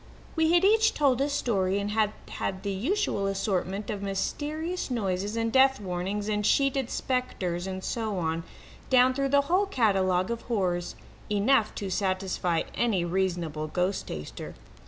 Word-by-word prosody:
We 320 -1 +3
had 350 +2 +5
each 440 +2 +4
told 275 -4 +2
a 280 - +1
story, 200 -9 0
and 200 +1 -2
had 215 -1 +2 0.2
had 190 0 -4
the 200 - -1
usual 220 - 0
assortment 195 0 -1
of 205 -2 -4
mysterious 300 - -3
noises 205 -2 -1
and 230 0 0
death 265 0 +5
warnings 195 +2 -3
and 210 -1 0
sheeted 275 +2 +2
spectres 190 -9 -2
and 190 0 -5
so 220 -4 -2
on, 165 -1 -1 0.5
down 255 0 +5
through 275 +1 0
the 280 +1 +5
whole 365 +8 +1
catalogue 190 - +2
of 235 - -3
horrors 180 -6 -1 0.3
enough 210 +2 +2
to 195 -2 -4
satisfy 185 -3 0
any 205 -8 +1
reasonable 175 -4 -1
ghost 180 +5 -1
taster. 75 -1 -7
205 Hz, 155 wpm, -27 LUFS, 185-260 Hz, 0.5 s, had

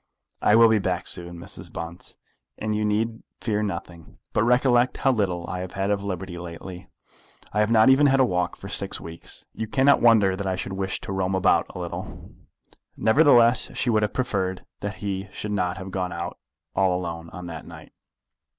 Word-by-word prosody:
"I 105 - +5
will 115 0 +8
be 110 -1 +3
back 90 -2 -1
soon, 85 0 -2
Mrs. 85 - -9
Bunce, 85 +1 -8 0.4
and 110 0 -2
you 105 0 0
need 110 +2 0 0.2
fear 105 -2 -1
nothing. 85 -4 -6 0.2
But - - +2
recollect 125 +1 +3
how 135 - +3
little 90 -7 -1
I 90 - -4
have 90 0 -6
had 100 +1 -1
of 100 -1 0
liberty 95 -2 -5
lately. 90 +1 -9 0.6
I 105 - +1
have 105 0 +3
not 115 +2 +6
even 145 +2 +5
had 135 0 +3
a 130 - +6
walk 90 -3 -1
for - - -10
six - - -1
weeks. 85 0 -7
You 110 - -4
cannot 135 +4 +4
wonder 110 -5 +5
that 100 0 -4
I 95 - 0
should 95 +1 -4
wish 95 0 -2
to - - -6
roam 95 0 0
about 95 - +3
a - - -10
little." - - -7 0.7
Nevertheless 120 -1 +4
she 120 - +1
would 110 -1 +3
have 105 -1 0
preferred 95 -7 -2
that 105 +1 -4
he 100 -1 -4
should 105 - -5
not 90 -2 -1
have 95 0 -7
gone 90 -1 -2
out 85 +1 -5 0.4
all 95 -2 +2
alone 85 -2 -5
on 90 -1 -8
that 85 -2 -8
night. - - -12
95 Hz, 195 wpm, -25 LUFS, 90-110 Hz, 0.7 s, will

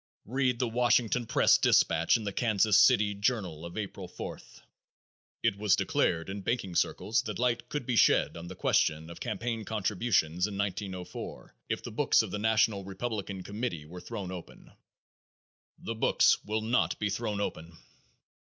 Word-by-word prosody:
Read 125 +1 0
the 125 - 0
Washington 120 0 +2
press - - +4
dispatch 85 +8 +3
in 110 - -7
the 100 -1 -3
Kansas 110 -2 +2
City 105 -5 +5
Journal 100 -6 -1
of 85 +3 -8
April 100 -3 -5
4th: - - -9 0.8
"It 100 - +1
was 105 -3 +4
declared 80 0 0
in 100 +1 -5
banking 100 -4 -2
circles 85 - +1
that - - -5
light 120 -1 0
could 145 -4 -3
be 125 - -1
shed - - +4
on 85 +1 -8
the - - -8
question 80 +2 +1
of 85 - -10
campaign 115 -2 -3
contributions 100 -4 0
in 100 -2 -6
1904 95 -2 -5 0.2
if - - -2
the - - -6
books - - +3
of - - -6
the 105 - -3
national 110 -2 +2
Republican 100 -1 -5
committee 100 -7 -4
were 90 +3 -10
thrown 100 -6 -6
open." 90 -2 -10 1.1
The 115 - -5
books 115 - +3
will 110 +1 -1
not 115 +3 +1
be 105 -1 -1
thrown 105 -1 -2
open. 85 -4 -5
105 Hz, 160 wpm, -29 LUFS, 95-115 Hz, 1.1 s, City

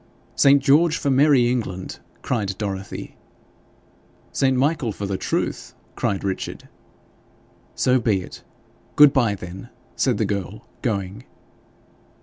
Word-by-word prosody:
'St. 140 -1 +5
George 155 +4 +4
for 140 - 0
merry 135 -2 +4
England!' 110 -7 -3 0.2
cried 100 -6 -2
Dorothy. 100 -2 -5 1.1
'St. 130 -1 +1
Michael 140 -3 +1
for 100 - -5
the 100 0 -2
Truth!' - - -3 0.2
cried 100 - -1
Richard. 95 -1 -4 1.1
'So 130 0 +2
be 105 -5 +1
it. - - -12 0.5
Good 145 -1 +7
bye, 115 -6 +2
then,' 95 +4 -9 0.3
said 125 -5 +1
the 110 - +1
girl, 100 +2 -4 0.2
going. 100 0 -3
115 Hz, 120 wpm, -22 LUFS, 100-135 Hz, 1.1 s, Good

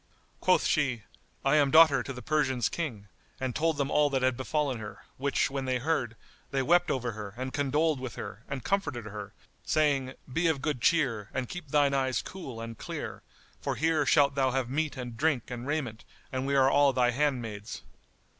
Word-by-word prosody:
Quoth - - +3
she, 125 -7 +1 0.4
"I 135 +3 +4
am 145 -2 +4
daughter 155 -2 +7
to - - -6
the 125 -2 -8
Persians' 135 -6 +1
King;" 120 -12 -4 0.3
and 130 -2 -2
told 160 -1 +1
them 140 0 -1
all 150 -1 +4
that 135 -2 0
had 130 -1 +3
befallen 135 0 -1
her; 105 -2 -9
which 140 +1 0
when 135 -1 -3
they 130 -1 +1
heard, 125 -4 -1 0.3
they 135 -1 0
wept 175 +5 +4
over 125 -2 -1
her 105 -1 -8
and 130 +1 -4
condoled 145 +1 +1
with 130 -4 -6
her 105 - -7
and 140 -2 -4
comforted 195 - -1
her, 105 -1 -7 0.3
saying, 140 -4 +1
"Be 165 +6 0
of 160 -4 +1
good 145 -6 -1
cheer 120 -12 +2
and 130 -1 -1
keep 180 +1 -7
thine 145 -1 +3
eyes 130 -2 +1
cool 135 -11 -8
and 115 0 -7
clear, - - -6 0.4
for - - -2
here 160 -1 +2
shalt 145 -3 +5
thou 135 -1 +2
have 130 -1 -1
meat 150 0 -1
and 120 -2 -6
drink 140 -3 0
and 120 +1 -5
raiment, 125 -9 -2 0.3
and 130 +1 -2
we 140 - +1
all 135 +2 +5
are - - 0
thy 125 -1 +3
handmaids." 120 -6 -2
135 Hz, 195 wpm, -29 LUFS, 125-150 Hz, 0.4 s, daughter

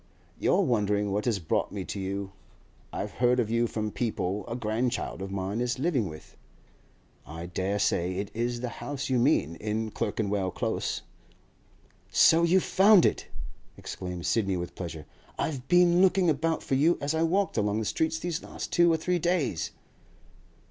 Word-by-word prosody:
'You're - - +3
wondering 105 - +1
what 105 +2 -1
has 115 -4 +1
brought 80 -4 -1
me 95 -3 -5
to 100 - -5
you. 95 +1 -4 0.6
I - - -3
have - - -4
heard 125 0 +2
of 110 -2 0
you 115 +1 +2
from 110 -1 -3
people 105 -4 -2
a 115 - -4
grandchild 115 -1 -2
of 95 - -4
mine 100 +3 -2
is 125 +1 -1
living 135 - 0
with. 75 0 -12 0.9
I 80 +2 -8
dare 95 +3 -2
say 90 -2 0
it 100 +1 -4
is 120 +1 -2
the 125 - -2
house 140 -1 -4
you 125 - +3
mean—in 110 - 0
Clerkenwell 105 -3 -1
Close.' - - -2 1.1
'So 165 +1 +6
you 170 +2 +4
have 190 - +2
found 195 -1 +6
it!' - - 0 0.5
exclaimed 90 -2 -6
Sidney 100 -5 +1
with 85 0 -5
pleasure. 80 -4 -7 0.3
'I've 135 -4 -3
been 175 0 +5
looking 185 -2 +4
about 160 +3 -1
for - - -3
you 150 +6 +4
as 140 +2 -1
I 160 - 0
walked 185 +4 +1
along 105 -1 +1
the 110 - -1
streets 160 +7 0
these 170 0 -3
last - - -7
two 170 0 +5
or 165 - +2
three 180 +2 0
days. 165 - 0
115 Hz, 175 wpm, -28 LUFS, 100-160 Hz, 1.1 s, So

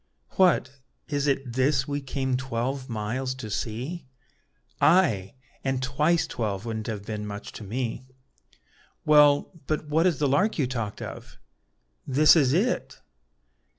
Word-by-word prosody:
"What, 145 -7 +2 0.3
is 145 -1 0
it 135 -3 -1
this 135 +2 +2
we 145 0 -2
came 130 -1 -2
twelve 130 +1 -3
miles 120 +4 -3
to 110 -5 -7
see?" 125 - -4 0.7
"Ay! 115 - +3 0.3
and 135 -1 -1
twice 150 +6 +2
twelve 105 -3 -3
wouldn't 110 -2 -4
have 105 -3 -5
been 105 -1 -4
much 100 0 -7
to - - -9
me." 120 +4 -4 1.0
"Well, 150 -1 +5 0.2
but 155 -1 -2
what 160 +4 +3
is 170 -6 +1
the 145 - +1
lark 190 +11 +2
you 145 - +2
talked 115 -5 -4
of?" - - -9 0.7
"This 150 +5 +6
is 140 -6 +4
it." 200 - 0
130 Hz, 140 wpm, -26 LUFS, 115-150 Hz, 1.0 s, This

